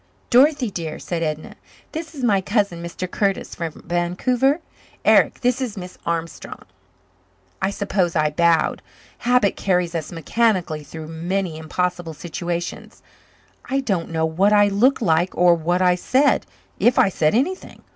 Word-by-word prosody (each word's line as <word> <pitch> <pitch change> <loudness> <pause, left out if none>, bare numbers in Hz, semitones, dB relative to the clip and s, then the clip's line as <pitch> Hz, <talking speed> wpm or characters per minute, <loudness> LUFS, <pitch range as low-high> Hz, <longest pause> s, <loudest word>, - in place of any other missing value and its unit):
"Dorothy 260 -2 +4
dear," 165 -4 -5
said 170 -2 -4
Edna, 155 -1 -3 0.4
"this 320 0 -6
is 270 - -6
my 205 -5 +3
cousin, 200 -4 0
Mr. 170 +2 -5
Curtis, 195 -2 -1
from 165 -2 -6
Vancouver. 230 - +1 0.5
Eric, - - +4
this 250 +1 +1
is 235 -5 -3
Miss 180 -1 -8
Armstrong." 165 -1 -4 1.0
I - - +1
suppose 195 -3 -1
I 155 -1 +2
bowed. 170 +1 +2 0.4
Habit 245 -4 +2
carries 180 -3 0
us 165 -3 -4
mechanically 175 -2 0
through 155 +1 -9
many 170 +2 -2
impossible 175 +1 -3
situations. 175 +1 -5 0.6
I 270 +1 0
don't 195 -11 -1
know 160 -1 0
what 185 +6 +2
I 205 -1 +5
looked 240 +6 +2
like 170 0 +1
or 175 -1 +6
what 175 +2 0
I 180 -1 +5
said, 260 +10 +2 0.3
if 240 - +3
I - - +5
said 155 -1 +1
anything. 345 +11 -2
180 Hz, 145 wpm, -21 LUFS, 165-225 Hz, 1.0 s, or